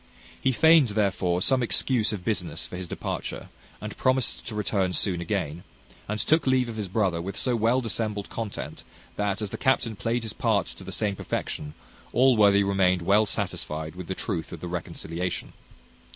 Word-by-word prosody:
He 130 - +3
feigned, 160 +1 +6
therefore, 95 -4 +1
some 130 -2 +3
excuse 120 -1 +3
of 95 -5 -5
business - - -2
for - - -7
his 90 0 -5
departure, - - -4 0.3
and - - -6
promised 130 -2 +1
to 110 - -5
return 95 -3 0
soon 90 -3 0
again; 85 -3 -2 0.5
and 105 +1 -1
took 155 +2 +2
leave 130 -1 +3
of 115 - -6
his 105 -3 -3
brother 95 -3 0
with 95 +2 -4
so 125 -2 +1
well 115 +3 +2
dissembled 110 -3 -2
content, 110 -3 -5 0.3
that, 105 0 -1
as 100 - -4
the - - -5
captain 130 -4 +2
played 115 +3 -1
his 110 - -4
part - - +1
to - - -9
the - - -7
same 105 -2 0
perfection, 75 -5 -4 0.4
Allworthy 105 -5 +5
remained 95 -3 +2
well 105 +4 +4
satisfied 80 -4 -3
with 90 -1 -8
the 95 - -3
truth 90 -5 -3
of 85 - -7
the 90 - -6
reconciliation. 85 0 -4
105 Hz, 180 wpm, -26 LUFS, 90-115 Hz, 0.5 s, feigned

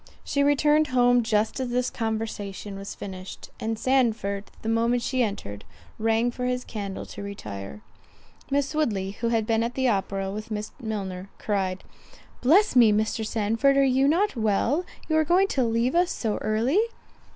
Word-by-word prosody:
She 280 - 0
returned 295 +2 +4
home 245 -1 +4
just 220 +1 0
as 260 -1 -2
this 250 +1 0
conversation 215 -3 -4
was 195 0 -7
finished, 185 -1 -8
and 225 0 -2
Sandford, 220 -6 +1 0.2
the - - -4
moment 230 +2 +2
she 255 +1 0
entered, 150 - -3 0.4
rang 225 +2 +2
for 250 +1 -4
his 250 0 -1
candle 200 -3 -5
to 205 - -9
retire. 105 - -7 0.7
Miss 280 +1 0
Woodley, 210 -11 0
who 225 +4 -3
had 225 -2 +1
been 225 0 +1
at 235 +1 -2
the 260 -1 +1
opera 195 -2 -1
with 215 +2 -6
Miss 210 -1 -4
Milner, 195 -4 -4
cried, 190 -3 -2 0.6
"Bless 345 +11 +4
me, 235 -4 +7
Mr. 215 +1 0
Sandford, 225 +6 +2
are 275 - +5
you 265 +1 +3
not 365 +6 +2
well, 230 - +1 0.2
you 315 - +1
are 315 - +4
going 360 +5 +3
to 265 - +1
leave 230 +2 +1
us 350 +1 +3
so 220 -3 -2
early?" 225 - +1
225 Hz, 170 wpm, -26 LUFS, 205-260 Hz, 0.7 s, me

